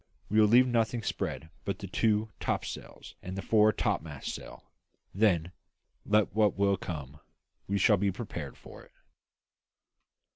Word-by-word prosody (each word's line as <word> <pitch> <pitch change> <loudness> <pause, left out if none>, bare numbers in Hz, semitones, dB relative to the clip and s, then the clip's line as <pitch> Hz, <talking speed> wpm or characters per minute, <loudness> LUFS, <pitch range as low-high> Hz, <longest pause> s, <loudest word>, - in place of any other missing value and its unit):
We 110 - +4
will 105 - +6
leave 120 +4 +6
nothing 115 -1 0
spread 80 -5 -3
but 100 - -2
the 100 - -7
two 105 +3 +1
topsails - - -4
and 95 +1 -6
the 95 - -4
fore 110 -1 +5
topmast 80 -7 -2
staysail; - - -9 0.5
then, 90 -5 +2 0.6
let 105 0 +3
what 105 -2 +2
will 100 0 +3
come, 75 -6 -7 0.5
we 100 - 0
shall 105 +2 +4
be 100 +1 +1
prepared 85 - -6
for - - -13
it." - - -19
100 Hz, 145 wpm, -30 LUFS, 90-110 Hz, 0.6 s, will